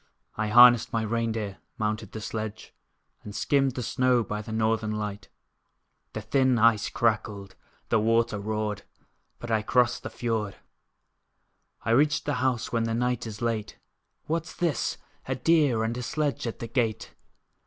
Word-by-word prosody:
I 110 0 -1
harnessed 120 +2 +7
my 115 -1 0
rein 115 +1 -1
deer, 105 -4 -4 0.2
mounted 110 -1 -2
the 110 - -7
sledge, 110 0 -5 0.5
And 105 0 -9
skimmed 135 +2 +2
the 125 - -3
snow 125 0 +2
by 105 +1 -4
the 110 - -9
northern 110 0 0
light. 105 -1 -5 0.8
The 110 - -4
thin 130 +3 +2
ice 115 -2 +4
crackled, 105 -3 -1 0.4
the 115 - +3
water 115 -1 +2
roared, 105 0 -2 0.6
But 120 - -7
I 110 -1 +2
crossed 125 +2 +2
the - - -6
fiord: 110 -4 -2 1.3
I - - +1
reached 145 +4 +3
the 145 - 0
house 130 -3 0
when 115 -1 +1
the 115 0 -1
night 125 -1 -1
is 110 +1 -7
late, 115 -3 -2 0.5
What's 165 +1 -3
this? 170 -4 -1 0.3
A - - -1
deer 145 -9 +3
and 115 +1 -1
a 125 - -4
sledge 145 0 -2
at 115 - -4
the 115 - -6
gate! 115 -3 -1
115 Hz, 160 wpm, -27 LUFS, 110-125 Hz, 1.3 s, harnessed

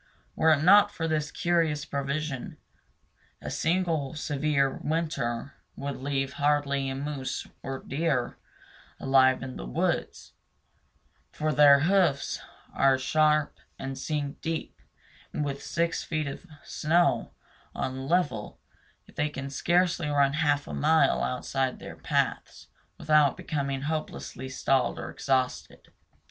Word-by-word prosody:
Were 160 - +3
it 155 -1 +4
not 205 +3 +7
for 165 -5 -3
this 155 -2 -1
curious 165 -5 0
provision, 140 -1 -3 0.8
a - - -6
single 165 -4 0
severe 145 -2 0
winter 140 -6 -2 0.2
would 140 0 -4
leave 135 0 -2
hardly 140 -2 +1
a 135 - -3
moose 135 -2 -4 0.2
or 135 - -4
a - - -11
deer 140 -4 0 0.6
alive 130 -1 +4
in 130 -1 -6
the - - -6
woods; - - -2 1.0
for 155 0 -1
their 145 -2 +7
hoofs 175 -4 +2 0.3
are 135 -1 +4
sharp 150 +2 +2 0.2
and 135 0 -5
sink 145 +1 -3
deep, 165 -1 -4 0.5
and 150 - -1
with 140 0 -4
six 170 +2 -1
feet 155 -2 -2
of 140 +6 -7 0.2
snow 155 -6 +1 0.4
on 130 - -2
a 130 - -5
level 140 -9 -1 0.5
they 150 0 0
can 140 -1 -6
scarcely 175 +3 +1
run 140 -1 +3
half 145 -2 +1
a - - -6
mile 155 -2 +3
outside 130 +1 -1
their - - -9
paths - - -2 0.3
without 150 -3 +3
becoming 140 -2 -3
hopelessly 150 -4 -4
stalled 130 -1 +1
or - - -6
exhausted. 130 -2 -2
145 Hz, 130 wpm, -28 LUFS, 135-155 Hz, 1.0 s, not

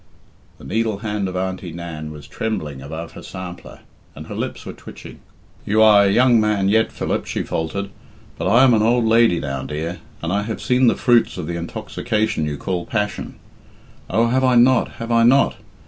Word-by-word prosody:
The - - -16
needle 110 0 -1
hand 105 -2 -1
of 90 - -6
Auntie 95 -1 -3
Nan 80 -2 -7
was 75 -2 -10
trembling 75 -8 -4
above 80 +4 -7
her - - -11
sampler, 90 -2 -9 0.3
and - - -9
her - - -8
lips - - -5
were - - -6
twitching. - - -12 0.4
"You 110 +2 +3
are 105 -2 +7
a 100 - +3
young 120 +1 +4
man 105 -2 +1
yet, 110 +2 +2
Philip," - - -3
she - - -2
faltered, 100 +5 -3 0.4
"but - - -3
I 115 +6 +5
am 130 -2 +6
an 110 - +3
old 120 +2 +2
lady 115 -5 +4
now, 70 -1 -4
dear, 80 +5 -5 0.2
and 85 +2 -1
I 100 - +1
have 110 +1 -4
seen 125 0 +2
the 115 - +4
fruits 120 -4 +2
of 90 - -4
the 85 +2 -4
intoxication 110 +1 -2
you 75 -1 -3
call 90 +2 -3
passion. 105 -2 -3 0.7
Oh, 115 +4 +2
have 130 +2 +1
I 130 -1 +4
not, 125 +1 +4
have 115 0 -6
I 115 0 +4
not? 130 +4 +4
105 Hz, 195 wpm, -20 LUFS, 85-115 Hz, 0.7 s, are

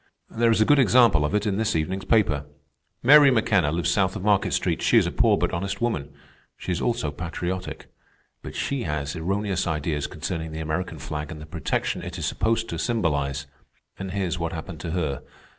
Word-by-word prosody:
"There 115 +1 +2
is 115 - +3
a 110 - +5
good 145 +3 +5
example 120 - +5
of 75 +7 0
it 105 +1 +1
in 100 -2 0
this 110 -3 0
evening's 95 +5 -2
paper. 80 -11 +2 0.6
Mary 145 +2 +8
McKenna 105 - +2
lives 85 +1 0
south 95 +1 +1
of 100 - -5
Market 105 -1 +2
Street. - - 0
She - - +4
is - - +5
a - - -2
poor - - +3
but - - 0
honest 95 +3 -3
woman. 80 -12 -2 0.5
She - - -5
is 85 - -1
also 120 -10 -1
patriotic. 90 +3 -5 0.6
But - - -9
she 140 -2 -2
has 75 -2 -3
erroneous 95 +2 -1
ideas 75 -2 -1
concerning 80 -1 -5
the 80 - -5
American 80 +3 -3
flag 75 0 -5
and 80 - -7
the 75 - -9
protection 75 - -2
it - - -7
is - - -3
supposed 115 0 0
to - - -4
symbolize. 70 - -1 0.5
And 95 -1 -4
here's 90 -2 -2
what 85 -1 -2
happened 80 0 -7
to 85 - -5
her. 75 -7 -2
90 Hz, 200 wpm, -25 LUFS, 80-105 Hz, 0.6 s, Mary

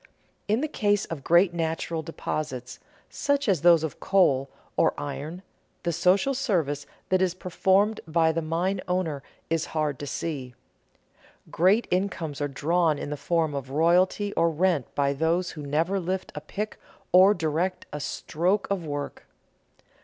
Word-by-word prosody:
_ - - -34 0.4
In 215 +4 +2
the 310 - 0
case 205 -8 +1
of 155 -5 -6
great 170 +1 +4
natural 165 0 -2
deposits, 145 -5 -5 0.3
such 285 -1 0
as 185 -8 +2
those 170 -1 +6
of 160 - -4
coal 140 -9 +3 0.3
or - - +3
iron, 145 +5 -5 0.4
the 170 - 0
social 185 - +3
service 165 - -1 0.2
that 185 0 +3
is 185 -1 +1
performed 190 +4 +1
by 160 0 +3
the 165 +1 -1
mine 175 +4 -1
owner 180 -6 -1 0.3
is 165 -1 +1
hard 150 -4 0
to 145 - -5
see. 135 -5 -4 1.0
Great 195 +7 +3
incomes 175 -6 -1
are 145 - +1
drawn 155 +3 +1
in 145 - -5
the - - -1
form 160 +1 0
of 135 -2 -5
royalty 180 +7 +2
or 165 0 +3
rent 165 -3 +1
by 140 -1 +2
those 165 +5 0
who 155 - -8
never 160 +7 0
lift 185 +1 -3
a 150 - -6
pick 210 +7 -5 0.3
or 190 +3 +7
direct 165 +3 -1
a 150 - -3
stroke 180 +7 -1
of 195 -3 0
work. 145 -2 -5
165 Hz, 160 wpm, -26 LUFS, 150-185 Hz, 1.0 s, or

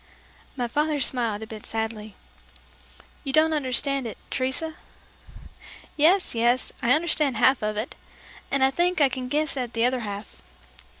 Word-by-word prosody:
'" - - -29
My 245 -1 -1
father 295 +4 0
smiled 235 -5 0
a - - -5
bit 215 -1 -9
sadly. 220 -1 -4 1.1
"You 275 - -3
don't 315 +3 +4
understand 275 -2 0
it, 220 - -7
Teresa?" 265 +5 -1 1.2
"Yes, 345 +6 +4
yes; 240 +2 +2
I 240 - +4
understand 300 -5 +2
half 260 +3 +4
of 215 0 -2
it, 220 +4 -3 0.6
and 275 -1 +2
I 265 - +4
think 350 +5 +1
I 280 -2 +5
can 255 -1 -5
guess 300 +3 0
at 250 -3 -4
the 230 0 +2
other 255 +1 +1
half." 205 -2 -7
255 Hz, 160 wpm, -25 LUFS, 230-295 Hz, 1.2 s, I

